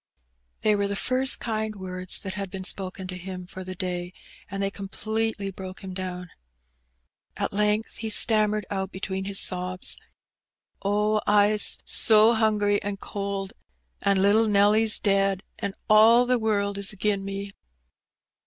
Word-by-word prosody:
They 215 -1 +3
were 200 0 0
the 200 - -2
first 255 +5 0
kind 220 -2 -3
words 185 -1 -2
that 190 - -5
had 195 0 -5
been 190 0 -6
spoken 190 0 -4
to 185 0 -6
him 180 0 -7
for 185 +1 -8
the 185 0 -7
day, 180 -1 -4 0.4
and 195 0 -3
they 195 - -1
completely 215 +1 -3
broke 185 0 -8
him 190 -1 -6
down. 180 -1 -6 1.1
At - - -2
length 210 +2 0
he 220 - -4
stammered 215 -1 +2
out 190 -1 -2
between 190 0 -4
his 195 0 +1
sobs 185 0 -1 0.4
— - - -54
"Oh, 210 +2 +1
Fs 210 0 +4
so 220 +1 +6
hungry 210 -2 +2
an' 200 0 -4
cold, 200 -1 -4 0.5
an' 200 -1 +2
little 205 +3 +4
Nelly's 210 +2 +4
dead; 195 -1 +1 0.2
an* 195 -1 -3
all 225 +3 +6
the 250 0 +1
world 200 -2 0
is 200 - 0
agin 205 -1 -1
me." 195 0 -5
200 Hz, 155 wpm, -25 LUFS, 190-215 Hz, 1.1 s, so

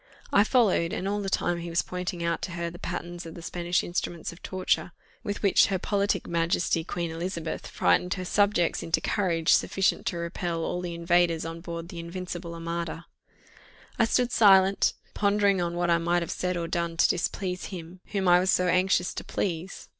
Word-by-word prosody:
I 200 - +6
followed; 210 -8 +2
and 190 - -2
all 205 +1 -1
the 195 - -2
time 175 -2 0
he 170 0 -6
was 170 +1 +1
pointing 180 -1 -4
out 170 0 -1
to 175 - -4
her 170 0 -3
the 175 - -11
patterns 175 0 -5
of 165 - -9
the 170 - -9
Spanish 175 +1 -1
instruments 175 -1 -3
of 170 - -16
torture, 185 -1 -1 0.3
with 205 0 -4
which 200 - +5
her 195 - 0
politic 200 0 0
majesty 165 0 0
Queen 170 -1 -3
Elizabeth 165 0 -4
frightened 180 0 +2
her 185 -1 -5
subjects 200 -3 +2
into 165 - +1
courage 170 -6 +1
sufficient 195 -1 +1
to 175 - -1
repel 170 0 -3
all 180 +2 -2
the 175 -1 -4
invaders 170 -1 +2
on 165 0 -6
board 170 -1 -6
the 175 - -7
invincible 170 0 -6
armada 170 0 -4 0.9
I 230 - +5
stood 245 +2 +1
silent, 195 -3 +5 0.2
pondering 200 -2 +2
on 170 0 -2
what 175 0 +1
I 170 - +4
might 170 +1 +1
have - - -5
said 180 -1 -2
or 170 -1 -2
done 170 -1 -2
to - - +5
displease 180 +1 -2
him 180 -1 -8
whom 195 -2 -1
I 175 0 +7
was 185 +1 0
so 180 -1 +3
anxious 180 0 +2
to - - -5
please. 180 0 -4
175 Hz, 195 wpm, -27 LUFS, 170-190 Hz, 0.9 s, I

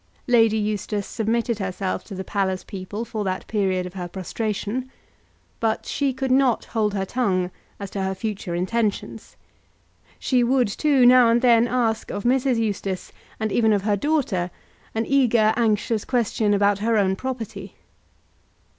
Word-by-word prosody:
Lady 225 -4 +4
Eustace 210 -1 -2
submitted 230 0 -1
herself 190 -1 -3
to 200 - -9
the 190 - -4
palace 190 -1 -1
people 200 +4 -6
for 220 -2 -4
that 185 -1 -3
period 190 -4 0
of 180 - -8
her 180 -2 -5
prostration, 215 +6 -3 0.7
but 225 -1 0
she 280 -1 0
could 260 0 -2
not 260 -3 +3
hold 215 -3 -1
her 195 -1 -1
tongue 185 -6 0 0.3
as 200 -1 -6
to 195 - -3
her 190 0 -1
future 190 -3 -4
intentions. 210 +4 -2 0.8
She 250 -2 +1
would, 250 0 +3
too, 275 +3 +3
now 250 -1 +7
and 235 +2 +2
then 235 -1 +5
ask 230 -3 0
of 205 - -4
Mrs. 255 0 +2
Eustace, 200 -4 -2 0.3
and 220 -1 -1
even 220 0 +3
of 200 -2 +1
her 205 -1 +2
daughter, 210 - 0 0.5
an 225 +1 0
eager, 240 -5 +3
anxious 220 -1 +1
question 220 -4 +1
about 200 0 +2
her 225 +1 +1
own 190 -2 +2
property. 255 -1 -6
220 Hz, 155 wpm, -23 LUFS, 195-240 Hz, 0.8 s, now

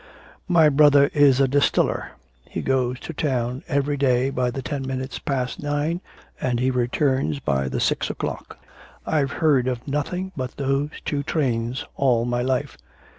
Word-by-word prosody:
My 170 -4 +5
brother 145 -1 +5
is 145 -3 +5
a 135 - +4
distiller. 140 +2 +1 0.4
He - - -4
goes 130 -1 0
to 165 - -6
town 130 -4 -1
every 145 -1 0
day 130 -1 +2
by 125 -2 0
the 130 +2 -5
ten 145 -3 -3
minutes 130 -1 -4
past 125 -3 -2
nine 145 +4 -1 0.4
and 125 -2 0
he 130 +1 +2
returns 125 - 0
by 65 -1 -1
the - - -2
six - - 0
o'clock. - - -5 0.5
I've 145 -3 0
heard 140 -6 +2
of 125 0 -3
nothing 180 +7 -2
but 130 -2 -5
those 140 +1 0 0.2
two 145 -1 -1
trains 125 -5 -1
all 120 -4 +2
my 120 0 0
life. 130 0 -1
135 Hz, 160 wpm, -23 LUFS, 125-145 Hz, 0.5 s, My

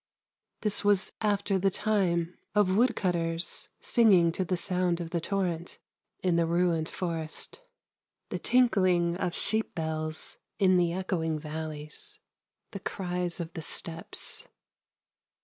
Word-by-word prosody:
This 210 -2 +2
was 205 -1 +3
after 205 -2 +1
the 195 +1 +3
time 180 -5 +1 0.2
of 195 -3 +4
woodcutters 175 -7 +1
singing 195 -8 +5
to 185 - -1
the 180 0 -1
sound 180 0 +1
of 165 -1 -5
the 170 - 0
torrent 180 -2 -2 0.5
in 180 -2 +3
the 170 -1 +3
ruined 170 -1 +1
forest; 165 - -5 0.7
the - - -3
tinkling 185 -9 +3
of 180 -2 -2
sheep 220 0 -1
bells 155 -1 -2 0.2
in 185 -3 +5
the 175 -1 +3
echoing 170 -3 -1
valleys; 155 - -4 0.5
the 200 - -5
cries 180 -2 -2
of 165 -1 -5
the 165 - -5
steppes. 165 +1 -4
180 Hz, 125 wpm, -29 LUFS, 165-195 Hz, 0.7 s, singing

